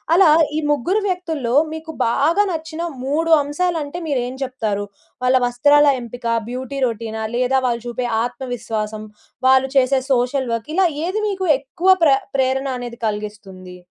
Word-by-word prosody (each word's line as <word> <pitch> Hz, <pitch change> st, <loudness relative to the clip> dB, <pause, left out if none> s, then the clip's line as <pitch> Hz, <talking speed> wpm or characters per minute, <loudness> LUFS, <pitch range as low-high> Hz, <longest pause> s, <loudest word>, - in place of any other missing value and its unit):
అలా 365 Hz, -2 st, +6 dB, 0.3 s
ఈ -, -, +2 dB
ముగ్గురు 345 Hz, -, +1 dB
వ్యక్తుల్లో, 320 Hz, -10 st, -2 dB, 0.2 s
మీకు 320 Hz, 0 st, -7 dB
బాగా 320 Hz, -, +2 dB
నచ్చిన 320 Hz, 0 st, -5 dB, 0.2 s
3 320 Hz, +4 st, +1 dB
అంశాలంటే 320 Hz, +2 st, -2 dB
మీరు 275 Hz, -5 st, 0 dB
ఏం 255 Hz, -, -6 dB
జెప్తారు? 220 Hz, -6 st, -2 dB, 0.4 s
వాళ్ళ 255 Hz, +1 st, +3 dB
వస్త్రాల 290 Hz, +4 st, +4 dB, 0.2 s
ఎంపిక, 240 Hz, +1 st, -10 dB, 0.3 s
బ్యూటీ 260 Hz, +2 st, -5 dB
రొటీనా? 220 Hz, -1 st, -4 dB
లేదా 255 Hz, +2 st, +2 dB
వాళ్ళు 235 Hz, -1 st, -2 dB
చూపే 240 Hz, +1 st, -3 dB, 0.2 s
ఆత్మవిశ్వాసం. 225 Hz, -4 st, -4 dB, 0.4 s
వాళ్ళు 265 Hz, 0 st, +4 dB
చేసే 265 Hz, 0 st, +3 dB
సోషల్ 250 Hz, +1 st, 0 dB
వర్క్ 230 Hz, +6 st, -4 dB
ఇలా 380 Hz, 0 st, +4 dB, 0.2 s
ఏది 390 Hz, +5 st, -1 dB
మీకు 380 Hz, -2 st, -2 dB
ఎక్కువ 305 Hz, +7 st, -2 dB
ప్ర 305 Hz, -, +6 dB, 0.2 s
ప్రేరణ 265 Hz, 0 st, +1 dB
అనేది 240 Hz, -1 st, -7 dB
కలిగిస్తుంది? 205 Hz, -3 st, -7 dB
260 Hz, 140 wpm, -20 LUFS, 235-315 Hz, 0.4 s, అలా